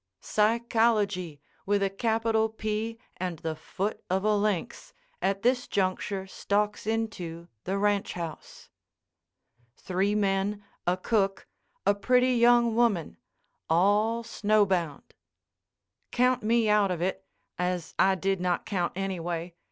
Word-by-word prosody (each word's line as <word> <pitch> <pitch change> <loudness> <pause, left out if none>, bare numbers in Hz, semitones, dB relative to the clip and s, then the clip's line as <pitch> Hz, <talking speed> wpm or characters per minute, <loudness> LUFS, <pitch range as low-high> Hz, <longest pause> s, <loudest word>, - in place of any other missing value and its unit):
Psychology, 215 -6 +1 0.3
with 200 0 +2
a 195 - +2
capital 225 +1 +1
P 220 +1 -3 0.2
and 180 -2 -3
the 160 0 -4
foot 195 +6 -4
of 190 +1 0
a 215 0 +3
lynx, 205 -4 -2 0.3
at 195 +1 0
this 245 +1 +2
juncture 190 0 -1
stalks 205 +2 -1
into 185 -7 -3 0.2
the 190 +2 -1
ranch 205 0 +1
house. 165 -3 -8 1.1
Three 190 +3 0
men, 200 0 0 0.2
a 180 +1 +2
cook, 195 -1 0 0.4
a - - +5
pretty 250 +5 +3
young 235 -1 +4
woman—all 205 - 0
snowbound. 200 -8 0 1.0
Count 250 +1 +2
me 225 +1 +2
out 210 -2 +4
of 175 -2 -2
it, 190 +1 -2 0.4
as 180 -2 -2
I 190 0 +5
did 195 0 -1
not 180 -1 0
count, 180 -4 -1
anyway. 175 -3 -3
200 Hz, 120 wpm, -28 LUFS, 185-220 Hz, 1.1 s, a